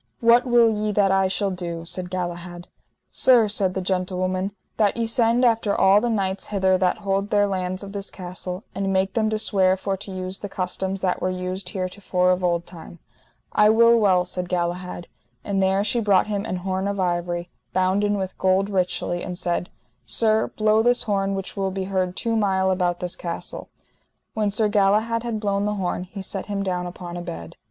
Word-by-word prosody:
What 235 +2 +5
will 240 -1 +5
ye 215 -1 0
that 195 -1 +3
I 195 0 +3
shall 195 +1 0
do? 170 -2 -5
said 180 +1 -1
Galahad. 175 -1 -5 0.4
Sir, 245 -4 +5
said 200 -3 0
the 190 - -2
gentlewoman, 185 +1 -1 0.3
that 210 -1 +2
ye 230 - +1
send 230 +1 +2
after 225 -3 +2
all 195 +2 +5
the 240 - 0
knights 195 -3 -1
hither 190 -2 +2
that 180 -1 +2
hold 195 +1 0
their 205 -1 +3
lands 185 -1 -3
of 200 - -8
this 200 -1 -5
castle, 180 +1 -6
and 195 0 -2
make 190 0 +1
them 220 -2 +1
to 215 - 0
swear 190 -3 +2
for 195 +1 -2
to 200 +1 -8
use 185 0 -3
the 205 - -6
customs 190 +1 -3
that 185 -2 0
were 185 - 0
used 185 0 -4
heretofore 185 -1 0
of 185 0 0
old 170 -1 +1
time. 170 -1 -11 0.5
I 210 0 +5
will 230 +1 +6
well, 185 -4 +3
said 180 -1 -4
Galahad. 175 0 -3 0.4
And 195 -1 -1
there 190 +1 +2
she 235 +3 0
brought 205 -4 +3
him 205 -1 -3
an 185 - -2
horn 190 +1 -1
of 200 -1 -2
ivory, 175 -1 -1 0.2
bounden 195 +3 +1
with 190 -1 -4
gold 190 +2 +2
richly, 180 -2 -1
and 180 -1 -5
said: 175 0 -2 0.4
Sir, 220 -1 +2
blow 215 0 +2
this 245 +2 +2
horn 195 -2 0
which 195 0 -6
will 195 -1 -1
be 190 0 -3
heard 185 -1 -1
two 230 -1 -1
mile 190 -3 +2
about 180 -2 0
this 180 -1 -3
castle. 170 -1 -6 0.6
When 215 -2 0
Sir 215 +2 +2
Galahad 210 +3 +2
had 230 -2 -3
blown 200 -1 0
the 210 0 -1
horn 180 -2 -2
he 195 +1 -8
set 190 0 -5
him 200 -1 -2
down 180 -2 -2
upon 175 0 -7
a - - -4
bed. 85 - -7
190 Hz, 200 wpm, -23 LUFS, 180-205 Hz, 0.6 s, will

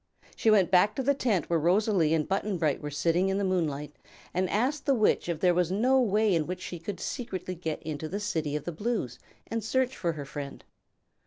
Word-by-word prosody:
She 225 - +2
went 195 -5 +4
back 200 +3 +4
to 265 - -1
the 280 +2 +3
tent 220 - 0
where 170 -1 +1
Rosalie 175 -1 +3
and 155 -2 0
Button 195 0 -1
Bright 155 -4 0
were 150 - -4
sitting 170 +5 +1
in 195 - 0
the 200 - 0
moonlight 150 -6 -1 0.4
and 185 0 0
asked 260 +9 0
the 275 - +4
Witch 215 -5 +2
if 165 -3 -2
there 180 -1 +4
was 180 0 +1
no 255 +7 +3
way 215 -2 +2
in 160 -3 +1
which 180 +1 -4
she 180 -2 -6
could 185 +3 -6
secretly 190 -8 -4
get 165 -3 -4
into 155 0 -4
the 200 - -3
City 160 -8 -2
of 150 - -3
the 175 - -4
Blues 170 - -3 0.3
and 225 -1 -3
search 260 +3 0
for 170 -2 -1
her 145 -2 -6
friend. 140 -1 -7
185 Hz, 225 wpm, -28 LUFS, 160-215 Hz, 0.4 s, went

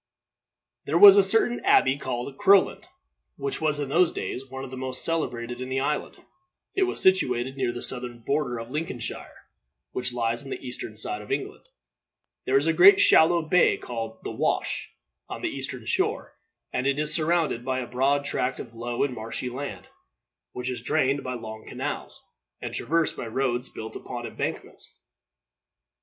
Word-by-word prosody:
There 155 - +1
was 200 +2 +11
a 200 - +7
certain 225 +5 +2
abbey, 130 +1 +4
called 130 -1 -4
Crowland, 200 - +4 0.5
which 140 +1 -3
was 150 -2 +1
in 145 -2 -3
those 170 +4 +4
days 135 +1 -5
one 130 +1 -6
of 135 - -8
the - - -6
most 130 0 -1
celebrated 125 -7 -2
in 130 - -5
the 130 0 0
island. 150 +2 -2 0.6
It 385 -2 +2
was - - -3
situated 130 -9 +2
near 130 -3 0
the 120 - -7
southern 125 -1 -3
border 125 +1 -1
of 115 +1 -7
Lincolnshire, 150 -6 -4 0.6
which 125 0 -2
lies 115 0 -1
on 135 - -10
the - - -4
eastern 120 -3 -6
side 105 -1 -3
of 105 - -10
England. - - -3 0.8
There 135 - +3
is 140 - +2
a 165 - +2
great 400 - +8
shallow 170 - +5
bay, 175 +3 +3
called 115 -2 -6
The - - -4
Wash, - - -1 0.4
on - - -7
this - - -1
eastern - - -6
shore, - - -1 0.4
and 125 +2 0
it 140 0 +1
is 150 +1 +1
surrounded 160 -6 +1
by 130 0 -1
a 130 - -2
broad 135 +4 +1
tract 125 -2 -1
of 115 - -8
low 120 +1 -2
and 140 -2 -1
marshy 115 +2 -5
land, 125 -8 -6 0.6
which 125 +1 -4
is 125 - -5
drained 135 +2 +1
by 130 0 -4
long 110 -2 -8
canals, - - -5 0.4
and - - -6
traversed 165 +1 0
by 115 - -6
roads 125 +1 -1
built 110 - -8
upon - - -6
embankments. - - -6
130 Hz, 175 wpm, -26 LUFS, 120-150 Hz, 0.8 s, was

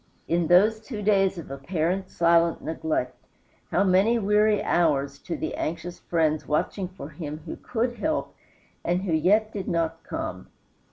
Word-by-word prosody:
In 170 0 +1
those 210 +6 +5
two 220 -2 -6
days 195 -2 +3
of 160 -5 -8
apparent 170 +6 -2
silent 170 0 +3
neglect, 155 -6 -2 0.5
how - - +2
many 195 +5 +4
weary 210 0 +3
hours 140 -4 +1
to 170 - -5
the - - -3
anxious 170 +2 -4
friends 155 -2 0
watching 180 +5 -1
for 185 -5 -9
him 150 0 -7
who - - -5
could 240 0 -2
help, 310 0 -1 0.5
and 175 +2 0
who 180 -4 -1
yet 210 +7 +3
did 195 -3 -4
not 165 -1 -1
come! - - -5
175 Hz, 155 wpm, -26 LUFS, 160-205 Hz, 0.5 s, those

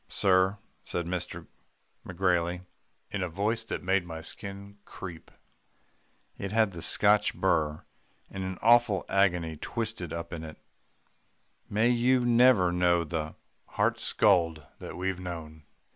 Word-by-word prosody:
'Sir,' 95 +1 +2 0.3
said 85 - -3
McGrailey 90 0 -3 0.5
in 100 - -2
a 90 - -1
voice 105 +6 -1
that - - -4
made 95 0 +2
my 80 -2 -7
skin 100 +4 -7
creep 85 -4 -9 1.1
it 100 - -4
had 110 -2 +3
the 85 -2 -8
Scotch 105 +4 +3
burr, 80 -5 0 0.5
and 95 -1 -5
an 95 -1 -4
awful 115 -4 +4
agony 90 -5 +1
twisted 110 -3 -4
up 85 0 -5
with 85 -2 -6
it 80 -1 -9 1.1
'may 110 +3 +2
you 125 +1 +3
never 120 -6 +5
know 90 -1 +2
the 80 -1 -4 0.4
heart - - +2
scald 80 -3 +2
that - - -8
we've 95 0 -2
known. 80 -4 -7
90 Hz, 130 wpm, -28 LUFS, 85-100 Hz, 1.1 s, never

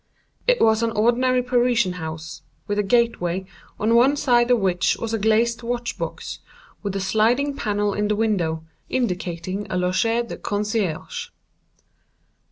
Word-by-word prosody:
It - - +4
was 220 0 +4
an 230 - +1
ordinary 245 +3 +2
Parisian 240 -5 +2
house, 160 0 -6 0.2
with 205 0 -1
a - - +5
gateway, 195 -5 +1 0.3
on 220 +2 +2
one 250 +5 +5
side 240 -4 +3
of 245 - +5
which 185 -3 +1
was 230 -1 -4
a 225 - 0
glazed 230 +3 +2
watch 240 0 -3
box, - - -5 0.4
with 200 -2 -3
a - - 0
sliding 230 +8 +2
panel 205 -4 0
in 210 +1 0
the 210 - +1
window, 175 -8 0 0.2
indicating 185 -4 -2
a - - -2
_loge 190 +6 +1
de - - -6
concierge. 205 -5 -2
215 Hz, 150 wpm, -23 LUFS, 190-240 Hz, 0.4 s, a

